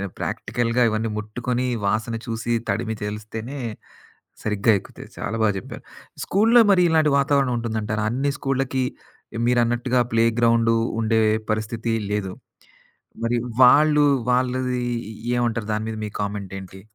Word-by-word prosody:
ఆహ్, 100 -1 -4
ప్రాక్టికల్‌గా 120 +2 -1
ఇవన్నీ 110 +1 -1
ముట్టుకొని, 120 +4 -2 0.2
వాసన 110 +3 0
చూసి, 115 +1 -3 0.2
తడిమి, 110 +2 -1
తెలిస్తేనే 110 +5 -6 0.8
సరిగ్గా 105 +1 +2
ఎక్కుతాయి - - -13
చాలా 115 - -3
బాగా 105 -2 +3
చెప్పారు. - - -9 0.4
స్కూల్లో 225 +5 +4
మరి 185 -2 +5
ఇలాంటి 160 -2 +3
వాతావరణం 140 -2 +2
ఉంటుందంటారా? 110 -2 -2
అన్ని 135 +4 0
స్కూల్లకి 135 -1 -1 0.6
మీరన్నట్టుగా 120 +1 +2
ప్లేగ్రౌండు 115 0 +3 0.3
ఉండే 110 0 +2 0.3
పరిస్థితి 110 +2 -2 0.2
లేదు. 105 -2 -2 0.9
మరి 120 +1 +1 0.3
వాళ్ళు, 150 +3 +6 0.3
వాళ్ళది 125 0 0 0.5
ఏ - - +2
ఏమంటారు? 115 -3 -1
దాని 110 +1 -2
మీద 110 - -4
మీ - - -3
కామెంటేంటి? 95 -2 -6
115 Hz, 120 wpm, -23 LUFS, 110-125 Hz, 0.9 s, వాళ్ళు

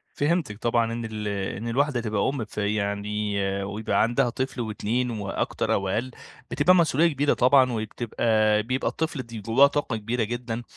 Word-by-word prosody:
فهمتِك 145 - 0
طبعًا 115 0 +1
إن 115 -1 -4
ال 105 -1 -5 0.3
إن 115 +3 -5
الواحدة 130 +1 +1
تبقى 110 -1 0
أم، 135 -6 -3
فيعني 105 0 -2 0.2
ويبقى 105 +2 -1
عندها 120 +2 +1
طفل 130 0 -3
و2 115 +3 -1
وأكتر 100 -3 -2
أو 95 -1 0
أقل، 120 +6 -2 0.4
بتبقى 185 +1 +4
مسئولية 165 -1 +3
كبيرة 145 +2 +2
طبعًا، 130 0 +4
وبتبقى 110 -1 +1
بيبقى 130 +3 -2
الطفل 155 -4 -2
د - - -21
جواه 120 +7 +5
طاقة 145 -5 -2
كبيرة 115 +2 -1
جدًا 120 +1 -4
115 Hz, 155 wpm, -25 LUFS, 105-130 Hz, 0.4 s, جواه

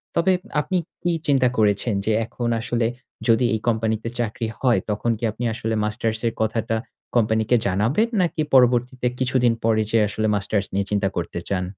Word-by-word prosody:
তবে 170 +3 +3 0.3
আপনি 185 +5 -1 0.2
কি 175 - +1 0.2
চিন্তা 135 -3 +4
করেছেন? 105 +1 +2
যে 110 - +1
এখন 120 +2 -4
আসলে 115 0 0 0.4
যদি 115 +1 +4
এই 110 - 0
কোম্পানি 110 -1 +1
তে 115 - -3
চাকরি 115 0 -2
হয়, 125 -3 +3
তখন 105 +3 -1
কি 115 - -13
আপনি 115 - -7
আসলে 110 0 -3
মাস্টার্স 110 +1 -1
এর 115 - -1
কথাটা 115 +1 0 0.4
কোম্পানিকে 110 0 +2
জানাবেন? 115 - +2
নাকি 170 -3 0
পরবর্তীতে 125 0 +3
কিছুদিন 130 -2 +2
পরে 110 -1 +3
যে 115 - +3
আসলে 110 +1 -1
মাস্টার্স 100 0 -1
নিয়ে 100 0 0
চিন্তা 100 -1 +1
করতে 85 0 -3
চান? 90 -2 0
115 Hz, 175 wpm, -23 LUFS, 105-125 Hz, 0.4 s, চিন্তা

